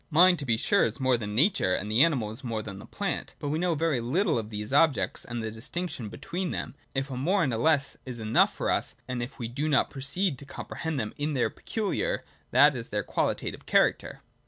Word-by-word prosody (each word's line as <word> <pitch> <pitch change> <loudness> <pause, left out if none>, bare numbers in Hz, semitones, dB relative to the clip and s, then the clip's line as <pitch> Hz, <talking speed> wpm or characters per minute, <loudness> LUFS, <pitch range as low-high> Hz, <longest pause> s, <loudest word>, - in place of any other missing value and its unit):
Mind 175 +2 +6
to 140 - -5
be 115 -2 +3
sure - - +3
is 115 +5 -1
more 130 -1 +3
than 105 -3 -4
Nature 130 - +3
and 105 +2 -3
the 115 +6 +6
animal 130 -11 +1
is 115 +5 -9
more 115 -3 -3
than 100 -3 -7
the - - -11
plant: - - -3
but 145 - -4
we 155 +2 0
know 175 -1 +1
very 155 -5 +1
little 155 - +1
of 110 -1 -6
these 105 +2 -5
objects 145 -1 +3
and 120 -1 -5
the 110 - -3
distinction 125 +1 -5
between 180 - -4
them, - - -4 0.2
if 135 +1 -1
a - - -3
more 180 +9 +2
and 130 -6 0
less 140 +3 +2
is 125 -2 -6
enough 110 -1 +3
for - - -1
us, - - -1
and 125 -1 -3
if 120 +4 -6
we 120 - -4
do 140 +6 -2
not 140 - +3
proceed 140 +3 0
to - - -10
com - - -7
prehend 160 -2 -4
them 110 -5 -3
in 150 0 -1
their 125 - +1
peculiar, 230 - -2 0.2
that - - +6
is - - -6
their - - -1
qualitative - - -2
character. - - +2
135 Hz, 230 wpm, -28 LUFS, 115-160 Hz, 0.2 s, Mind